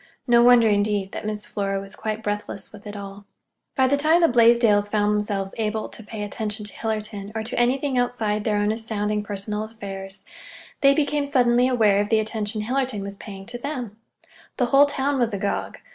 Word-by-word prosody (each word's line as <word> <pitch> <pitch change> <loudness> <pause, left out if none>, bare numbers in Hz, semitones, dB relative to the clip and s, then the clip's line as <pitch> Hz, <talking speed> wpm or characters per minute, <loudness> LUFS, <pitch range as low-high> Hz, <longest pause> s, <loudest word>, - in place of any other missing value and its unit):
No 240 -2 +5
wonder, 240 -1 +6
indeed, 205 -2 +1
that - - -5
Miss 210 -1 -4
Flora 195 -1 -2
was 195 +1 -9
quite 215 0 -4
breathless 205 -1 -4
with 210 0 -12
it 205 - -7
all. 200 0 -9 0.5
By 265 - +4
the 280 +2 +2
time 315 +4 +4
the 335 - +6
Blaisdells 230 -4 +4
found 210 0 +1
themselves 205 -2 -2
able 220 0 -2
to 225 - -7
pay 210 0 -6
attention 210 0 -3
to 205 - -5
Hillerton, 215 -2 -4
or 220 - -2
to 225 - -3
anything 260 +2 +1
outside 220 -4 -1
their 210 -1 +1
own 205 +1 +1
astounding 210 -2 -2
personal 205 +1 -4
affairs, 195 -3 -8 0.6
they 275 0 +6
became 290 -1 0
suddenly 245 -2 +3
aware 215 -6 +3
of 205 - -3
the 220 - +4
attention 215 -1 -2
Hillerton 255 -3 -1
was 200 0 -7
paying 195 -2 -9
to 240 +3 -7
them. 250 -6 -5 0.6
The 250 - +2
whole 280 +1 +7
town 280 0 0
was 230 -4 +1
agog. 200 +1 -3
215 Hz, 190 wpm, -23 LUFS, 205-245 Hz, 0.6 s, whole